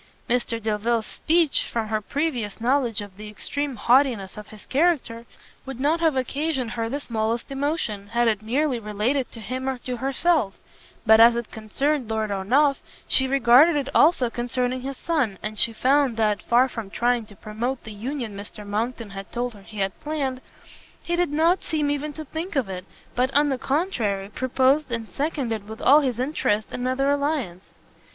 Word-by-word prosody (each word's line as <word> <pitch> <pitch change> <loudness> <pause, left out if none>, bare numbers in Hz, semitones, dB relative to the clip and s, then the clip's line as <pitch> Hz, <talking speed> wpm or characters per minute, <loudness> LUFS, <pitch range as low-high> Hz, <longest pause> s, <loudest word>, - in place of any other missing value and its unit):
Mr 235 -1 0
Delvile's 220 +1 0
speech, 325 -2 +1
from 225 -2 -2
her 215 -1 0
previous 245 -5 -2
knowledge 240 -2 +1
of 200 -2 -10
the 210 0 -8
extreme 285 +6 -3
haughtiness 235 -4 +2
of 210 -1 -9
his 215 -1 -12
character, 270 -7 0 0.4
would 270 -2 -7
not 300 +5 +2
have 320 -4 +2
occasioned 265 -1 -1
her 225 0 -2
the 280 +4 -2
smallest 230 0 -2
emotion, 270 -8 -2
had 235 +3 +1
it 215 -2 +1
merely 255 +3 0
related 225 +5 -1
to 230 - -10
him 255 +4 -3
or 265 - -2
to 245 0 -5
herself; 270 - +1 0.5
but 220 0 +7
as 230 +1 +8
it 235 -1 -4
concerned 250 +4 -1
Lord 220 -1 -1
Ernolf, 265 +9 +2 0.3
she 265 - +3
regarded 275 +4 +6
it 280 -2 -1
as - - -9
also 280 -7 +4
concerning 245 +1 -1
his 270 0 -5
son, 270 - 0
and 215 0 -3
she 230 - +2
found 260 +1 +2
that, 210 -2 +1
far 245 +2 +4
from 225 -5 -6
trying 240 +1 0
to 205 - -14
promote 230 +6 -4
the 220 - -8
union 235 0 -4
Mr 205 +1 -9
Monckton 220 +1 -3
had 195 0 -8
told 245 0 -2
her 205 - -14
he 205 +1 -7
had 195 -1 -2
planned, 275 -4 -3 0.6
he 345 - -1
did 350 -2 +1
not 325 +5 +2
seem 300 -3 0
even 290 +1 -2
to 310 +1 -7
think 325 +5 -5
of 270 -6 +1
it, 185 -1 -6 0.3
but, 255 +2 +1
on 290 0 +4
the 265 -2 -1
contrary, 235 - -1
proposed 260 +4 +1
and 230 -1 -2
seconded 250 -8 -3
with 220 +1 -8
all 285 +4 +6
his 255 -5 -1
interest 245 -6 0
another 255 +2 -1
alliance. 280 - -1
245 Hz, 185 wpm, -24 LUFS, 220-285 Hz, 0.6 s, as